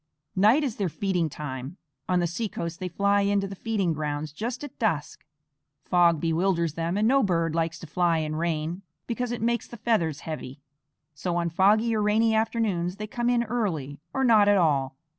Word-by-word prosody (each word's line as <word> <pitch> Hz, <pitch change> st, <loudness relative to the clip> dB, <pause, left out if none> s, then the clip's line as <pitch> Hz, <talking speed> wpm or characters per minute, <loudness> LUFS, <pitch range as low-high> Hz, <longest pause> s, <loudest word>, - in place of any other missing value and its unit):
Night 215 Hz, +10 st, +5 dB
is 255 Hz, -6 st, -2 dB
their 195 Hz, -4 st, 0 dB
feeding 180 Hz, -2 st, -1 dB
time; 140 Hz, +2 st, -6 dB, 0.3 s
on 180 Hz, -1 st, +3 dB
the 175 Hz, -, +1 dB
seacoast 175 Hz, -2 st, -4 dB
they 185 Hz, -, -3 dB
fly 200 Hz, +3 st, +2 dB
in 200 Hz, 0 st, +2 dB
to 195 Hz, -, -2 dB
the 195 Hz, -, -7 dB
feeding 195 Hz, -5 st, -1 dB
grounds 150 Hz, 0 st, -3 dB
just 235 Hz, -, -4 dB
at 285 Hz, -1 st, -9 dB
dusk. 160 Hz, -, -1 dB, 0.6 s
Fog 170 Hz, -3 st, +4 dB
bewilders 170 Hz, 0 st, +1 dB
them, 165 Hz, +3 st, -2 dB
and 215 Hz, +1 st, +2 dB
no 270 Hz, +3 st, +4 dB
bird 165 Hz, -6 st, +1 dB
likes 165 Hz, 0 st, -1 dB
to -, -, -10 dB
fly 170 Hz, +1 st, +1 dB
in 155 Hz, -1 st, -2 dB
rain, 165 Hz, +2 st, -2 dB, 0.2 s
because 245 Hz, 0 st, -2 dB
it 240 Hz, -2 st, -3 dB
makes 235 Hz, 0 st, 0 dB
the 235 Hz, -, -10 dB
feathers 210 Hz, -10 st, 0 dB
heavy; 145 Hz, -3 st, -6 dB, 0.5 s
so 170 Hz, +5 st, -3 dB
on 170 Hz, -1 st, 0 dB
foggy 215 Hz, +6 st, +3 dB
or 215 Hz, -, +1 dB
rainy 220 Hz, +2 st, +3 dB
afternoons 215 Hz, -6 st, 0 dB
they 210 Hz, +1 st, -5 dB
come 240 Hz, +3 st, -1 dB
in 240 Hz, -1 st, +2 dB
early, 185 Hz, -, -2 dB
or 265 Hz, -, -1 dB
not 220 Hz, -5 st, +5 dB
at 205 Hz, 0 st, +5 dB
all. 140 Hz, -6 st, +1 dB
185 Hz, 195 wpm, -26 LUFS, 165-220 Hz, 0.6 s, Night